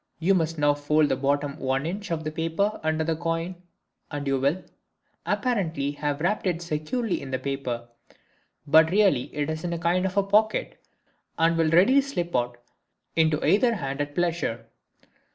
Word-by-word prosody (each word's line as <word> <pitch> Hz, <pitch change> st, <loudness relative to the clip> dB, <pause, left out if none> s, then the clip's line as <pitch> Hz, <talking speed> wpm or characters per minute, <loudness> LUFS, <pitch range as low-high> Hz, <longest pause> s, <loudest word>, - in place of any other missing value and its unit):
You 175 Hz, +4 st, +2 dB
must 165 Hz, -3 st, 0 dB
now 145 Hz, -1 st, +3 dB
fold 145 Hz, +1 st, +2 dB
the -, -, +2 dB
bottom 140 Hz, +2 st, -1 dB
1 135 Hz, +2 st, -1 dB
in. 185 Hz, +6 st, -3 dB
of 165 Hz, -2 st, -2 dB
the 155 Hz, -, -3 dB
paper 165 Hz, +7 st, -1 dB
under 160 Hz, 0 st, 0 dB
the 165 Hz, 0 st, 0 dB
coin 165 Hz, +2 st, -2 dB, 0.6 s
and 145 Hz, -2 st, -5 dB
you 135 Hz, -1 st, +1 dB
will, 145 Hz, +8 st, 0 dB, 0.6 s
apparently, 165 Hz, -, 0 dB
have 145 Hz, 0 st, -3 dB
wrapped 195 Hz, +3 st, 0 dB
it 175 Hz, -2 st, 0 dB
securely 170 Hz, +8 st, -2 dB
in 135 Hz, -, -7 dB
the 130 Hz, -, -1 dB
paper; 130 Hz, -3 st, -4 dB, 0.8 s
but 160 Hz, +2 st, +6 dB
really 190 Hz, -9 st, +3 dB
it 145 Hz, -1 st, -2 dB
is 155 Hz, 0 st, -4 dB
in 175 Hz, -1 st, -2 dB
a -, -, -2 dB
kind 175 Hz, +3 st, +1 dB
of 195 Hz, +1 st, -1 dB
pocket, 215 Hz, +2 st, +1 dB, 0.5 s
and 165 Hz, +1 st, +3 dB
will 165 Hz, -1 st, +2 dB
readily 195 Hz, -, +5 dB
slip 175 Hz, -, -4 dB
out 120 Hz, 0 st, 0 dB, 0.6 s
into 160 Hz, -2 st, +2 dB
either 230 Hz, +3 st, +3 dB
hand 140 Hz, -5 st, -3 dB
at 145 Hz, 0 st, -4 dB
pleasure. 170 Hz, -10 st, -1 dB
160 Hz, 170 wpm, -26 LUFS, 145-180 Hz, 0.8 s, but